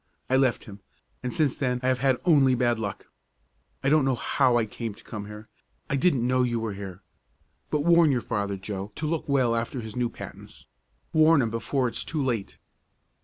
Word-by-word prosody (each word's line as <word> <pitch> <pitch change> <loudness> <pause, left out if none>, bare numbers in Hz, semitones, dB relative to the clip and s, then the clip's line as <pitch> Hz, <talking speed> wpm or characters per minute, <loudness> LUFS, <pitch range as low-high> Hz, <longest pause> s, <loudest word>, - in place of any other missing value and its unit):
I - - +5
left 130 -2 +2
him, 105 -2 -11 0.4
and 125 - -3
since 155 -6 +1
then 125 -3 0
I - - +1
have 130 -1 +1
had 135 -1 +2
only 140 -7 +5
bad 120 -2 +1
luck. 100 -3 -5 0.7
I 135 - +2
don't 155 0 +4
know 135 -1 +2
how 125 +1 +2
I 115 - +2
came 110 0 -6
to - - -16
come 105 -3 -7
here. 105 +1 -9 0.5
I - - +2
didn't 140 -4 +2
know 130 +1 +2
you 120 -2 0
were 110 -2 -3
here. 95 -1 -8 0.7
But 150 - 0
warn 170 -1 +5
your 125 -3 +1
father, 100 -3 -2
Joe, 95 +1 -6
to 155 - -4
look 155 -1 -2
well 130 -4 +2
after 115 +3 -2
his 110 -2 -8
new 125 -1 0
patents. - - -10 0.5
Warn 160 0 +6
him 115 - -2
before 125 +3 0
it 120 - -4
is - - -1
too 155 -3 -2
late." 115 -6 -2
125 Hz, 210 wpm, -26 LUFS, 110-140 Hz, 0.7 s, Warn